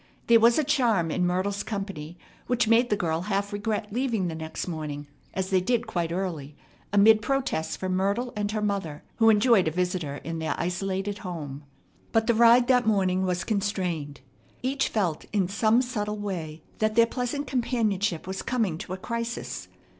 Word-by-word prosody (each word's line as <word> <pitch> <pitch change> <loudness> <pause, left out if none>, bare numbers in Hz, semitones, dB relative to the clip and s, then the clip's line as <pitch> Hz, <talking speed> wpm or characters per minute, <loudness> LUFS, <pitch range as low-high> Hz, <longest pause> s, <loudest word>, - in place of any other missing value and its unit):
There 230 -1 +6
was 230 +1 +5
a 310 - +3
charm 235 - +2
in 180 +1 +1
Myrtle's 195 +3 -1
company 195 -7 -5 0.3
which 245 -2 +1
made 235 +2 +4
the 210 - +3
girl 165 -3 -1
half 200 +1 -2
regret 210 0 -2
leaving 230 -7 0
the - - -4
next 160 +2 -5
morning, 150 -4 -5 0.3
as 190 +1 -2
they 185 -1 +4
did 235 +5 0
quite 170 -2 -2
early, 165 -6 -3 0.4
amid 215 +2 +6
protests 260 -9 -1
from 185 -1 -2
Myrtle 200 +7 0
and 205 -1 -1
her 215 -1 -2
mother, 195 -8 -2
who 225 -1 +5
enjoyed 215 -3 +5
a - - +1
visitor 180 -4 -2
in 165 0 -4
their 160 -1 -1
isolated 195 +3 -2
home. 150 -6 -6 0.5
But 225 -1 +3
the 235 - +3
ride 235 +2 +6
that 250 -2 +3
morning 190 -3 +2
was 180 -1 -1
constrained. 185 - -2 0.4
Each 275 +2 +1
felt 180 -8 -1
in 200 -4 +1
some 220 +5 +3
subtle 210 -4 -3
way 170 -6 -5 0.2
that 215 0 +1
their 230 0 +6
pleasant 250 +4 -3
companionship 220 - 0
was 190 +1 -4
coming 220 -10 -1
to 185 -2 -6
a - - -4
crisis. 230 +4 -4
200 Hz, 175 wpm, -26 LUFS, 175-230 Hz, 0.5 s, There